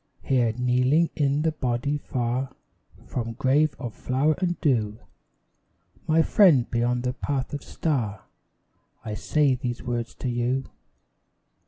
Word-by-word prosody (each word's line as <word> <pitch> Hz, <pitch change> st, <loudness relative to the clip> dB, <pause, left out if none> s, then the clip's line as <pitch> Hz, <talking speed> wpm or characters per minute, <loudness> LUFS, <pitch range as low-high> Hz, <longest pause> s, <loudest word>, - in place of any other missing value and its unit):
Here, 125 Hz, -4 st, +2 dB
kneeling 125 Hz, +6 st, +2 dB
in 145 Hz, 0 st, +1 dB
the 160 Hz, -, +2 dB
body, 140 Hz, 0 st, -1 dB
far 125 Hz, 0 st, -2 dB, 0.5 s
From 115 Hz, -2 st, -4 dB
grave 135 Hz, +4 st, +2 dB
of 120 Hz, -5 st, -6 dB
flower 135 Hz, +8 st, +1 dB
and 175 Hz, -2 st, -1 dB
dew, 110 Hz, -8 st, +1 dB, 1.1 s
My 160 Hz, +1 st, +4 dB
friend 160 Hz, -, +5 dB
beyond 120 Hz, +1 st, 0 dB
the 125 Hz, 0 st, -1 dB
path 135 Hz, 0 st, -3 dB
of 145 Hz, -, -4 dB
star, 115 Hz, -, -2 dB, 0.8 s
I 110 Hz, -, -4 dB
say 145 Hz, +6 st, +2 dB
these 125 Hz, -1 st, -4 dB
words 120 Hz, -2 st, -3 dB
to -, -, -5 dB
you. 125 Hz, +2 st, 0 dB
130 Hz, 130 wpm, -25 LUFS, 120-145 Hz, 1.1 s, friend